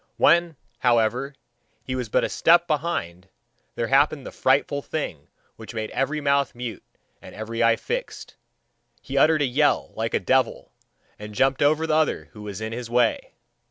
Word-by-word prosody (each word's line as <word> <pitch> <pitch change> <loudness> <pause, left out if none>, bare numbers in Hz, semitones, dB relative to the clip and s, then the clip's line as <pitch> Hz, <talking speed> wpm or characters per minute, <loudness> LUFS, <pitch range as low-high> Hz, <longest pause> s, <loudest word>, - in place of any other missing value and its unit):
When, 170 0 +4 0.2
however, 120 +3 +1 0.5
he 130 - -5
was 125 -3 -3
but - - +2
a - - 0
step 170 +1 +4
behind, 140 - -3 0.5
there 115 - -1
happened 140 0 +2
the - - -7
frightful 140 +2 +1
thing 85 - -5 0.3
which 110 0 -10
made 110 -1 -4
every 140 +3 -1
mouth 140 -2 +1
mute 120 -2 -6 0.4
and - - -12
every 115 +2 -4
eye 115 0 +5
fixed - - -5 0.6
he - - -8
uttered 155 -1 +4
a - - +3
yell 145 +3 +1
like 115 +1 -2
a - - +2
devil, 130 0 0 0.5
and 105 0 -9
jumped 135 +2 +2
over 155 +2 +3
the 160 - 0
other 155 -1 0
who 105 - -12
was 105 -1 -7
in 110 +1 -4
his 120 0 -6
way. 120 -1 +1
130 Hz, 170 wpm, -24 LUFS, 115-150 Hz, 0.6 s, eye